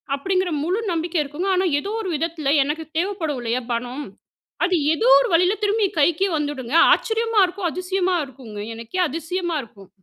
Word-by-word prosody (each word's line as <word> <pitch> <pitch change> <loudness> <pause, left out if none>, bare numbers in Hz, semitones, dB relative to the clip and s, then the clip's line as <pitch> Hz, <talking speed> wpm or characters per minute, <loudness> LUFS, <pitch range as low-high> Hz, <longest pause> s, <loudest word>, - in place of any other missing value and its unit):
அப்படிங்கிற 370 +5 0
முழு 360 +7 0
நம்பிக்கை 335 +1 -2
இருக்குங்க. 295 +6 -4
ஆனா 370 +1 +1
ஏதோ 395 - -6
ஒரு 390 - -4
விதத்தில 315 -2 -1
எனக்கு 300 +3 -3
தேவைப்படும் 335 -6 -1
இல்லையா, 240 +2 -1
பணம். 245 +4 -3 0.6
அது 365 +1 +1 0.2
ஏதோ 270 -7 0
ஒரு - - +1
வழியில 360 +4 +4
திரும்பி 415 +1 +2
கைக்கே 335 +6 +3
வந்துடுங்க. 290 -3 -3 0.2
ஆச்சரியமா! 455 -2 0
இருக்கும் 360 0 -3
அதிசயமா! 370 +1 -1
இருக்குங்க. 245 -6 -11 0.2
எனக்கே 230 +11 -6
அதிசயமா 335 +3 -3
இருக்கும். 200 -4 -16
330 Hz, 155 wpm, -22 LUFS, 280-370 Hz, 0.6 s, வழியில